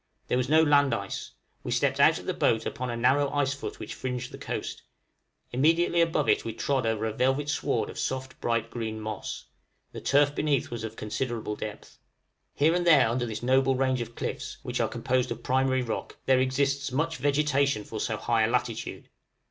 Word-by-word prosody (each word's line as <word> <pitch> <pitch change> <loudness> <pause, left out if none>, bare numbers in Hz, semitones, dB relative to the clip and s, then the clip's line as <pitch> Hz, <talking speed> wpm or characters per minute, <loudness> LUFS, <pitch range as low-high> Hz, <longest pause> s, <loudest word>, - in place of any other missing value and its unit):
There - - +2
was 125 +1 -1
no 160 +1 +6
land 145 -2 +4
ice; 100 -1 -5 0.3
we - - -6
stepped - - +1
out - - +6
of - - -9
the - - -1
boat 115 0 +1
upon 125 0 -3
a 120 - -3
narrow 135 +4 +3
icefoot 140 0 -2
which - - -7
fringed 125 -1 -4
the - - -9
coast; - - -4 0.7
immediately 165 +6 +3
above 165 -3 +1
it - - +3
we 115 - -4
trod 130 +1 0
over 110 -1 0
a 110 - -2
velvet 135 +5 +1
sward - - 0
of - - -8
soft 130 0 -4
bright 115 -1 0
green 110 -2 -4
moss; 110 -2 -5 0.5
the - - -8
turf 145 +1 +3
beneath 145 -5 0
was 120 -2 -5
of 110 0 -5
considerable 110 0 -3
depth. 105 0 -8 0.6
Here 155 +3 +3
and 175 0 0
there 145 -7 +7
under 120 +1 -1
this 110 0 -5
noble 130 +1 +3
range 130 -1 +1
of 115 0 -7
cliffs, - - -4
which - - -3
are - - +1
composed 130 0 0
of 120 0 -5
primary 130 0 +2
rock, 115 - -4
there 130 -1 +4
exists 135 +1 0
much 160 +5 -1
vegetation 140 -4 +1
for 110 +1 -6
so 110 0 -1
high 115 0 +1
a 110 - +4
latitude. 125 -2 -2
130 Hz, 195 wpm, -27 LUFS, 115-140 Hz, 0.7 s, there